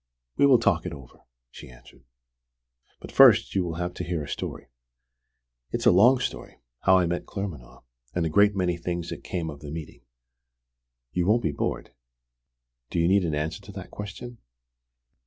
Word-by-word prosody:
We 140 - +4
will 130 -3 +7
talk 95 -6 +1
it 85 - -5
over," 65 -4 -13 0.3
she - - -12
answered. 60 0 -18 0.9
"But - - -10
first - - +6
you 95 - +1
will 85 -2 -4
have 90 +1 -3
to 90 - -5
hear 85 -3 -3
a - - -8
story. - - -5 1.0
It's - - -3
a - - +7
long 115 +9 +6
story: - - -5 0.2
how 95 -1 +5
I 90 - +3
met 85 +1 -3
Claremanagh, 70 -11 -7 0.3
and 90 -2 0
a - - 0
great 100 +4 +4
many 90 -2 0
things 85 0 -4
that - - -7
came 80 -3 -4
of 70 - -11
the 75 - -9
meeting. 80 0 -8 1.1
You 90 +3 -1
won't 115 +3 +3
be 80 - +1
bored?" 70 - -3 1.0
"Do - - -4
you 85 0 +3
need 95 +1 +3
an 80 -3 -1
answer 75 +2 -3
to 100 - -12
that 95 -2 -9
question?" 115 +4 -8
90 Hz, 180 wpm, -26 LUFS, 80-100 Hz, 1.1 s, will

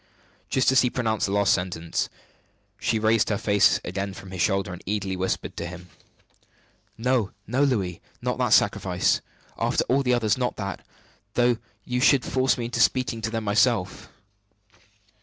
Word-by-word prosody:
Just 130 0 +3
as 130 -1 +5
he 125 - +2
pronounced 110 -4 -1
the - - -3
last 100 0 +3
sentence, 90 -2 -2 0.7
she 115 - 0
raised 110 0 +2
her 105 - +1
face 100 -1 +3
again 95 +1 -4
from 95 -1 -11
his 95 -2 -4
shoulder, 95 -2 +1
and 90 - -9
eagerly 100 -2 -2
whispered 95 0 -2
to 85 - -3
him: 90 0 -10 1.1
"No, 120 -3 +1 0.2
no, 125 +6 0
Louis! 100 -11 0 0.2
Not - - -2
that - - +2
sacrifice, - - +2 0.4
after - - +1
all 135 +2 +1
the 125 -2 +2
others 115 0 +1
not 125 -1 -1
that, 100 -2 -5 0.5
though 120 -1 +3 0.3
you 125 0 -1
should 135 0 +4
force 130 0 +1
me 120 - -3
into 120 - -3
speaking 130 -3 +2
to 110 - -2
them 115 0 -3
myself!" 105 0 +1
110 Hz, 165 wpm, -25 LUFS, 95-125 Hz, 1.1 s, as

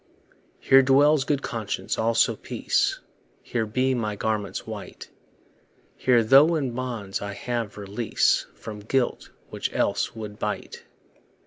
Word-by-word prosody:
Here 135 0 +6
dwells 140 +2 +4
good 140 -1 0
conscience, 110 -3 -3
also 115 +1 +2
peace; - - -1 0.4
Here 115 -2 -2
be 130 +4 +1
my 110 -4 -2
garments 105 -2 -2
white; - - -9 0.8
Here, 120 -3 +3
though 140 +8 +6
in 135 -5 -1
bonds, 120 -6 -4
I 100 0 -4
have 115 -3 -4
release 105 +3 0
From 105 -1 -8
guilt, 120 +4 -1 0.2
which - - -3
else - - 0
would 105 -2 -8
bite. - - -5
115 Hz, 125 wpm, -25 LUFS, 105-130 Hz, 0.8 s, Here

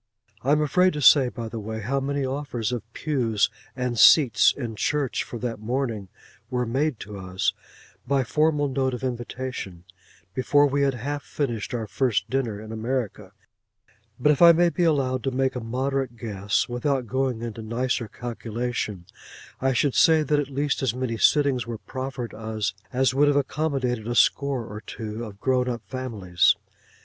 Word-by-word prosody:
I 135 - 0
am 150 +1 +4
afraid 180 +5 +3
to 150 - -3
say, 135 -1 +7
by 115 -2 -6
the 115 0 -6
way, 110 +1 -5
how 135 +6 -1
many 140 0 -1
offers 130 -5 -3
of 120 -2 -5
pews 120 -8 0 0.2
and 125 -3 -2
seats 120 -9 +7
in 120 -5 -5
church 145 +4 0
for 120 - -7
that 115 -2 -4
morning 115 -3 -2 0.4
were 125 -1 0
made 135 +2 0
to 105 -1 -8
us, 95 0 -1 0.5
by 135 0 +2
formal 150 +2 +1
note 130 -1 0
of 125 - -9
invitation, 120 -7 -5 0.5
before 145 +5 +3
we 140 0 +1
had 135 -2 +2
half 145 +4 -3
finished 125 -5 -3
our 115 -2 -2
first 115 0 0
dinner 120 -6 -1
in 110 +1 -9
America, 110 -4 -3 0.9
but 150 +4 +4
if 145 - 0
I 170 -1 +10
may 175 +1 +4
be 175 - 0
allowed 130 -5 +1
to - - +2
make 130 0 0
a - - -2
moderate 130 +1 -2
guess, 100 -3 -1
without 125 +1 -1
going 130 0 -1
into 115 -1 -5
nicer 120 +2 -1
calculation, 115 -4 -4 0.6
I 135 0 +2
should 135 +2 +1
say 160 -1 +5
that 150 0 +1
at 145 -1 -2
least 140 +1 -1
as 125 -3 0
many 125 -3 -2
sittings 135 -2 +3
were 115 -1 -4
proffered 130 0 -6
us, 110 -3 -3 0.2
as 130 0 +2
would 145 +2 +4
have 145 0 +3
accommodated 135 -5 -1
a 120 - -2
score 135 -1 +2
or 105 0 -8
two 110 +1 -6
of 100 -2 -11
grown 125 0 +1
up 120 -2 -4
families. 105 -9 +1
125 Hz, 175 wpm, -25 LUFS, 115-140 Hz, 0.9 s, I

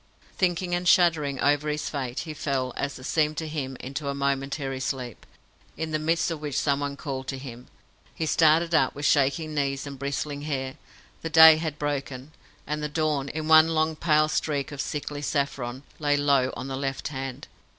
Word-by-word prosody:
Thinking 180 -1 0
and 175 0 -1
shuddering 160 -7 +3
over 145 +1 +2
his 150 0 -2
fate, 130 -4 -3
he 155 - -6
fell 135 -4 -2
as 140 0 -3
it 130 - -12
seemed 155 +2 +1
to 160 - -3
him 135 -4 -4
into 140 +3 -5
a 140 - -2
momentary 140 0 -2
sleep, 130 -3 -4 0.5
in 160 -1 -3
the 155 - 0
midst 165 +2 +1
of 160 -2 -5
which 145 -3 -3
someone 140 0 0
called 135 -3 -5
to 135 - -3
him. 125 -2 -9 0.5
He 160 - -2
started 165 +2 +3
up, 135 -5 +3
with 145 +1 -4
shaking 145 +3 +2
knees 140 -2 -1
and 140 -2 -8
bristling 140 +1 -3
hair. 135 -3 -3 0.5
The 165 - -4
day 160 -1 +9
had 155 -2 -3
broken, 140 -2 -4 0.3
and 150 0 -3
the 150 - -2
dawn, 150 -3 -1
in 155 +1 -4
one 160 0 +8
long 155 0 +1
pale 155 -1 +3
streak 145 -2 -1
of 140 -1 -4
sickly 145 0 -4
saffron, 140 -3 -2 0.2
lay 145 -1 +2
low 140 -3 +2
on 130 - -5
the 135 - -4
left 135 0 -3
hand. 135 -2 -6
145 Hz, 190 wpm, -26 LUFS, 135-155 Hz, 0.5 s, day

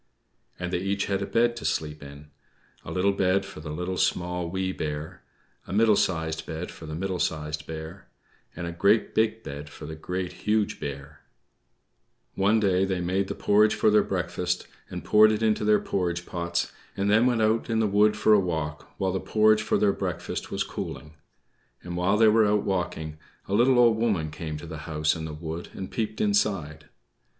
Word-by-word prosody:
And 90 0 -4
they - - +1
each 100 +2 -1
had 100 -1 -1
a 100 - -2
bed 120 0 +2
to - - -7
sleep 75 -1 -2
in: 70 +1 -12 0.5
a - - -8
little 95 +2 +2
bed 95 0 +1
for 95 - -10
the 75 0 -7
Little, 90 +4 -3
Small, 90 -1 0
Wee 95 +1 -1
Bear; 80 +2 -5 0.5
a - - -5
middle 110 +1 +5
sized 80 -4 -1
bed 80 +2 -5
for 80 - -11
the 75 - -5
Middle 95 +1 -2
Sized 75 -1 -2
Bear; 80 +3 -8 0.5
and 85 - -5
a 85 - -3
great 100 +6 +2
big 110 0 +1
bed 70 +1 -7
for - - -10
the 80 - -6
Great, 90 +3 -4
Huge 105 0 0
Bear. 70 +1 -7 1.1
One 100 +3 +3
day 95 -3 +2
they 95 -1 -1
made 95 +2 0
the - - -4
porridge 105 +1 +3
for 110 - +3
their 105 0 +6
breakfast, 90 -1 -2 0.2
and - - -6
poured 110 +1 +6
it 110 +1 -1
into 110 -1 +2
their 105 0 +5
porridge 90 -2 -2
pots, 85 -1 -2 0.3
and 100 - 0
then 110 +4 +4
went 120 -3 +2
out 110 +2 +1
in 115 -1 +1
the 110 - +3
wood 105 +1 +3
for 110 - +4
a 105 - +6
walk 80 -5 -3
while 95 -1 0
the 95 - -1
porridge 110 +1 +3
for 110 - +1
their 100 -2 +3
breakfast - - -4
was - - -1
cooling. 75 +1 -6 0.7
And 85 0 -6
while 90 +4 +2
they 110 0 +6
were 110 0 +5
out 105 0 +2
walking, 80 -5 -3 0.3
a 95 - -3
little 125 +4 +4
Old 120 -2 +5
Woman 100 -10 0
came 80 -1 -5
to 75 - -9
the 80 -2 -7
house 75 -1 +1
in 80 -1 -5
the 80 - -6
wood 80 +2 -6
and 95 - -6
peeped 110 -2 -3
inside. 100 -7 0
95 Hz, 200 wpm, -26 LUFS, 80-105 Hz, 1.1 s, their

